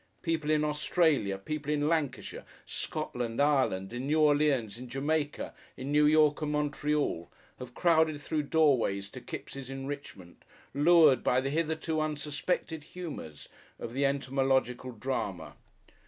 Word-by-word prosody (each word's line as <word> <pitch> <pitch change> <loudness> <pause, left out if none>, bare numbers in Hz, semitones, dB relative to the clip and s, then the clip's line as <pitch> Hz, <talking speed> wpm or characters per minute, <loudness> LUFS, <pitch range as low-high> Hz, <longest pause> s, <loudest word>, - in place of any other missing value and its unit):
People 160 -3 -1
in 155 -1 +3
Australia, 150 - +1
people 150 +8 -4
in 150 0 +1
Lancashire, 155 -5 -2 0.2
Scotland, 120 -1 -4
Ireland, 130 -10 +2
in 125 +3 -4
New 155 +2 +2
Orleans, 145 -8 +2
in 125 0 -9
Jamaica, 145 +3 -2 0.2
in 135 +2 -5
New 150 0 +5
York 150 0 +4
and 150 -1 -1
Montreal, 150 - -1 0.3
have 125 0 -9
crowded 160 -3 +3
through 150 +1 -1
doorways 125 -11 +2
to - - -9
Kipps' 135 -2 -7
enrichment, 135 -9 -8 0.3
lured 150 -1 +5
by 125 - +3
the 135 +1 -2
hitherto 160 0 -1
unsuspected 150 +2 -2
humours 150 - -8 0.3
of 115 - -7
the 135 +2 0
entomological 135 -2 0
drama. 105 - -4
145 Hz, 130 wpm, -30 LUFS, 125-155 Hz, 0.3 s, New